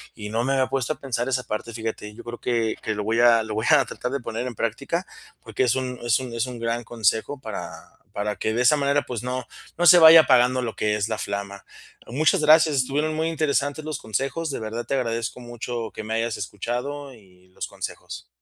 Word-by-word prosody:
y 105 -2 -7
no 115 +2 -1
me 135 - +1
había 130 -1 +2
puesto 135 +2 -1
a - - -19
pensar 125 -2 -2
esa 130 -1 0
parte, 115 +1 -5
fíjate, 110 -2 -5
yo 120 - -11
creo 120 0 -7
que 115 -3 0
que 110 - -2
lo 105 - -3
voy 110 +2 0
a 120 -1 +6
lo 110 -1 -5
voy 110 +2 -1
a 150 -3 +6
tratar 125 - -5
de 140 - -1
poner 115 +1 -4
en 125 - -6
práctica 140 - -2 0.4
porque 110 +2 -2
es 125 - +2
un 130 -1 -3
es 120 0 +3
un 130 -2 -7
es 115 0 0
un 125 -2 -7
gran 115 +1 -2
consejo 115 +4 0
para 110 -5 -6 0.4
para 105 +1 -2
que 110 - -1
de 120 - 0
esa 125 +4 +6
manera, 140 0 +1
pues, 120 -3 -5
no 125 0 -3 0.3
no 175 - +1
se 175 +1 +9
vaya 160 0 +10
apagando 130 -2 +4
lo 115 - -4
que 105 0 0
es 105 -1 -1
la 110 - -2
flama. 100 -1 -5 0.4
Muchas 150 +6 +2
gracias, 155 0 +5
estuvieron 145 +4 0
muy 160 +1 -1
interesantes 150 -2 0
los 155 -3 -4
consejos, 135 +9 -2
de 140 - -3
verdad 115 +2 -5
te - - -3
agradezco 115 -2 -2
mucho 120 -1 -5
que - - -6
me 110 +1 -4
hayas 115 0 -1
escuchado 125 +8 -4
y 95 -5 -20
los 90 - -6
consejos. - - -7
120 Hz, 230 wpm, -24 LUFS, 110-140 Hz, 0.4 s, vaya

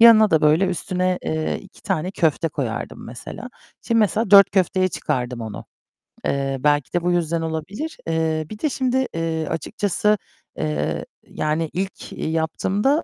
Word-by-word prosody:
Yanına 220 -2 +8
da 160 - +4
böyle, 155 +5 +4
üstüne, 185 0 0
eee, 155 0 -1
2 195 - -17
tane 180 -2 -1
köfte 165 -3 +1
koyardım 130 -7 -4
mesela. 120 - -8 0.3
Şimdi 230 - +1
mesela 215 0 +2
4 200 -1 +9
köfteye 185 0 +2
çıkardım 125 -7 -2
onu. 110 -2 -6 0.6
Eee, 135 -1 0
belki 145 0 +1
de 175 - +2
bu 175 +1 +1
yüzden 170 -1 +1
olabilir. 165 - -4
Eee, 160 -1 0
bir 215 - -8
de 305 - +1
şimdi, 260 0 0
eee, 165 -1 -1
açıkçası, 205 +6 0 0.4
eee, 75 -1 -1 0.2
yani 155 +1 -1
ilk 190 +2 -4
yaptığımda, 185 - 0
165 Hz, 145 wpm, -22 LUFS, 155-200 Hz, 0.6 s, 4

